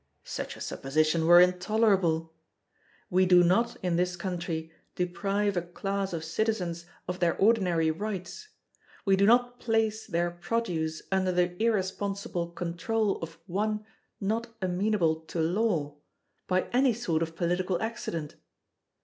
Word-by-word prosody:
Such -, -, -5 dB
a -, -, -12 dB
supposition 155 Hz, +4 st, 0 dB
were 175 Hz, +1 st, +9 dB
intolerable! 180 Hz, -3 st, +2 dB, 0.8 s
We 185 Hz, +1 st, +4 dB
do 180 Hz, -1 st, +7 dB
not 220 Hz, +7 st, +2 dB
in 175 Hz, -2 st, +1 dB
this 180 Hz, 0 st, +1 dB
country 170 Hz, -3 st, -4 dB, 0.2 s
deprive 195 Hz, +3 st, 0 dB
a 175 Hz, -, +1 dB
class 195 Hz, +3 st, -3 dB
of 165 Hz, -2 st, -4 dB
citizens 175 Hz, -2 st, -2 dB, 0.2 s
of 180 Hz, +1 st, -3 dB
their 170 Hz, -2 st, +2 dB
ordinary 180 Hz, -7 st, +3 dB
rights, 205 Hz, -, -5 dB, 0.6 s
we 195 Hz, -1 st, +5 dB
do 200 Hz, +1 st, +3 dB
not 245 Hz, +1 st, +3 dB
place 220 Hz, -1 st, 0 dB
their 175 Hz, +1 st, 0 dB
produce 175 Hz, -4 st, -2 dB
under 190 Hz, -1 st, +2 dB
the 180 Hz, 0 st, +1 dB
irresponsible 195 Hz, -4 st, -1 dB
control 185 Hz, +5 st, -1 dB
of 165 Hz, 0 st, -7 dB
one 210 Hz, +3 st, -1 dB, 0.3 s
not 220 Hz, +4 st, -1 dB
amenable 185 Hz, -3 st, +1 dB
to 170 Hz, -, -4 dB
Law, 165 Hz, -4 st, 0 dB, 0.5 s
by 185 Hz, 0 st, +2 dB
any 255 Hz, 0 st, +4 dB
sort 170 Hz, -9 st, -1 dB
of 165 Hz, 0 st, -3 dB
political 180 Hz, +1 st, 0 dB
accident! 170 Hz, -9 st, -4 dB
180 Hz, 130 wpm, -28 LUFS, 170-210 Hz, 0.8 s, were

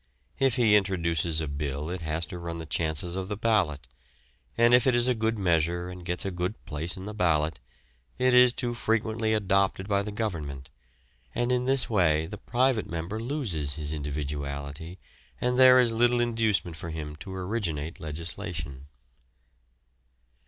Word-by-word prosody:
If 135 Hz, -3 st, +3 dB
he 115 Hz, -5 st, +4 dB
introduces 85 Hz, -5 st, +1 dB
a 80 Hz, -, -3 dB
bill 70 Hz, +2 st, -3 dB
it 90 Hz, -1 st, -4 dB
has 80 Hz, +1 st, -2 dB
to 90 Hz, +3 st, -8 dB
run 85 Hz, -1 st, -5 dB
the 80 Hz, -, -6 dB
chances 85 Hz, +3 st, -1 dB
of 95 Hz, -1 st, -3 dB
the 105 Hz, 0 st, -4 dB
ballot, 85 Hz, -, +1 dB, 0.7 s
and 120 Hz, +1 st, +5 dB
if 125 Hz, +1 st, +5 dB
it 130 Hz, -, +4 dB
is 120 Hz, +1 st, +4 dB
a 125 Hz, -, +4 dB
good 110 Hz, -1 st, -1 dB
measure 85 Hz, -1 st, +1 dB
and 90 Hz, 0 st, -9 dB
gets 90 Hz, +1 st, -3 dB
a 95 Hz, -, -1 dB
good 90 Hz, +4 st, -3 dB
place 80 Hz, +2 st, -3 dB
in 95 Hz, -, -7 dB
the 105 Hz, -, -6 dB
ballot, 80 Hz, -6 st, +1 dB, 0.6 s
it 130 Hz, 0 st, +3 dB
is 125 Hz, 0 st, +7 dB
too 120 Hz, 0 st, -2 dB
frequently 110 Hz, -1 st, 0 dB
adopted 100 Hz, -1 st, +1 dB
by 100 Hz, -1 st, +2 dB
the 105 Hz, +1 st, -5 dB
Government, 80 Hz, -11 st, -4 dB, 0.6 s
and 120 Hz, +1 st, 0 dB
in 125 Hz, 0 st, +1 dB
this 135 Hz, 0 st, +3 dB
way 80 Hz, -7 st, +2 dB
the 100 Hz, +4 st, -8 dB
private 125 Hz, -2 st, +1 dB
member 85 Hz, +6 st, -4 dB
loses 105 Hz, -, -2 dB
his 75 Hz, -1 st, -2 dB
individuality 70 Hz, +2 st, -5 dB, 0.4 s
and 125 Hz, +1 st, 0 dB
there 130 Hz, 0 st, +8 dB
is 120 Hz, -2 st, +4 dB
little 120 Hz, +1 st, +3 dB
inducement 110 Hz, -8 st, +1 dB
for 85 Hz, -, -6 dB
him 75 Hz, -2 st, -5 dB
to 95 Hz, +2 st, -8 dB
originate 90 Hz, -6 st, -3 dB
legislation. 80 Hz, -3 st, -6 dB
90 Hz, 165 wpm, -27 LUFS, 80-115 Hz, 0.7 s, there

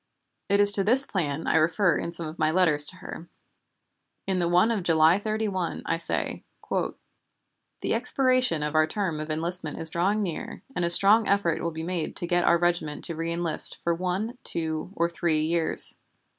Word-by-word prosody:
It 200 Hz, 0 st, +2 dB
is 205 Hz, 0 st, +10 dB
to 200 Hz, -1 st, +5 dB
this 255 Hz, +7 st, +5 dB
plan 160 Hz, -, -4 dB
I -, -, +1 dB
refer 165 Hz, +2 st, +1 dB
in 170 Hz, -, -4 dB
some 170 Hz, -1 st, -3 dB
of 155 Hz, +2 st, -10 dB
my 155 Hz, -, +1 dB
letters 155 Hz, -4 st, +1 dB
to 170 Hz, -, -10 dB
her. 175 Hz, -2 st, -10 dB, 1.0 s
In 190 Hz, -1 st, -2 dB
the 175 Hz, -, 0 dB
one 180 Hz, +6 st, +2 dB
of 220 Hz, -4 st, -2 dB
July 165 Hz, +1 st, +3 dB
31 210 Hz, -4 st, -4 dB
I 165 Hz, -, -1 dB
say: 165 Hz, -, -4 dB, 0.3 s
"The -, -, -7 dB
expiration 250 Hz, -, +1 dB
of 150 Hz, +1 st, -4 dB
our 155 Hz, 0 st, +2 dB
term 170 Hz, -3 st, -3 dB
of 155 Hz, +1 st, -7 dB
enlistment 160 Hz, 0 st, -3 dB
is 160 Hz, -1 st, -1 dB
drawing 200 Hz, +5 st, -1 dB
near 170 Hz, -5 st, -7 dB
and 180 Hz, -, -2 dB
a 170 Hz, -, 0 dB
strong 205 Hz, +5 st, +5 dB
effort 195 Hz, -5 st, 0 dB
will 170 Hz, -, -2 dB
be 160 Hz, 0 st, -7 dB
made 170 Hz, -1 st, -4 dB
to -, -, -2 dB
get 175 Hz, 0 st, 0 dB
our 170 Hz, -, +3 dB
regiment 170 Hz, -3 st, -2 dB
to 170 Hz, -, -4 dB
reënlist 165 Hz, 0 st, +2 dB
for 170 Hz, -, 0 dB
one, 185 Hz, +8 st, -4 dB
two, 160 Hz, +1 st, -4 dB
or 170 Hz, -, 0 dB
three 170 Hz, -2 st, -1 dB
years. 165 Hz, +1 st, +3 dB
170 Hz, 185 wpm, -25 LUFS, 160-195 Hz, 1.0 s, is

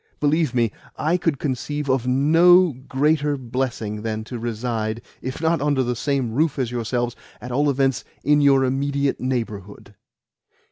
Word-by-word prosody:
Believe 150 Hz, -2 st, +1 dB
me, 115 Hz, -3 st, +2 dB, 0.3 s
I 160 Hz, +3 st, +1 dB
could 165 Hz, -5 st, 0 dB
conceive 145 Hz, +2 st, -3 dB
of 130 Hz, -2 st, +1 dB
no 165 Hz, +6 st, +5 dB
greater 145 Hz, +3 st, 0 dB
blessing 120 Hz, -4 st, -3 dB
than 110 Hz, 0 st, -3 dB
to 120 Hz, +1 st, -7 dB
reside, 115 Hz, -1 st, -3 dB, 0.2 s
if 130 Hz, 0 st, -5 dB
not 160 Hz, -1 st, +1 dB
under 145 Hz, -2 st, +1 dB
the 125 Hz, 0 st, -1 dB
same 135 Hz, -2 st, -1 dB
roof 150 Hz, +5 st, +1 dB
as 125 Hz, -3 st, -1 dB
yourselves, 120 Hz, 0 st, -2 dB, 0.2 s
at 125 Hz, -, -8 dB
all 145 Hz, +4 st, +2 dB
events 135 Hz, -2 st, +1 dB, 0.2 s
in 150 Hz, 0 st, +4 dB
your 135 Hz, -2 st, +5 dB
immediate 140 Hz, +1 st, 0 dB
neighbourhood." 110 Hz, -6 st, -4 dB
130 Hz, 150 wpm, -22 LUFS, 120-145 Hz, 0.3 s, no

